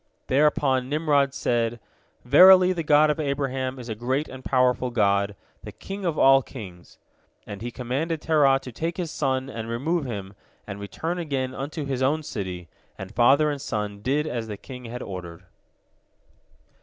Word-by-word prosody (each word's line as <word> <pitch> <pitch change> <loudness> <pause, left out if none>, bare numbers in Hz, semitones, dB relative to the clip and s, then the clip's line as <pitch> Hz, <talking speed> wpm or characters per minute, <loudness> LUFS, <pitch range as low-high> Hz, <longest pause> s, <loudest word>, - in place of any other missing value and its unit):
Thereupon 135 -2 +2
Nimrod 145 -2 +2
said, 120 -3 -1 0.5
"Verily, 185 +7 +7
the 170 - -3
God 150 0 +4
of 150 - -3
Abraham 135 -3 -2
is 125 -2 -9
a 110 - -3
great 130 +7 -2
and 130 0 -10
powerful 125 -1 +2
God, 100 -3 +1 0.3
the - - -9
King 195 0 -7
of 165 -3 -1
all 135 0 +6
kings," 95 -10 -11 0.5
and 100 -1 -8
he 120 - -4
commanded 135 +7 -3
Terah 145 -4 +3
to 125 - -8
take 165 +8 -4
his 175 -4 -3
son 130 -3 -1
and 115 -3 -6
remove 150 +7 -1
him, 100 -5 -6 0.3
and 100 -1 -7
return 160 - -4
again 135 -6 -2
unto 145 +3 -5
his 135 -2 -3
own 150 +4 +1
city, 90 - -5 0.3
and 95 +2 -8
father 140 +6 +4
and 140 -2 -5
son 105 -3 -4
did 140 +7 0
as 120 -6 -4
the 105 -2 -6
king 125 +1 -10
had 120 +2 -6
ordered. 90 -2 -8
130 Hz, 170 wpm, -25 LUFS, 115-150 Hz, 0.5 s, Verily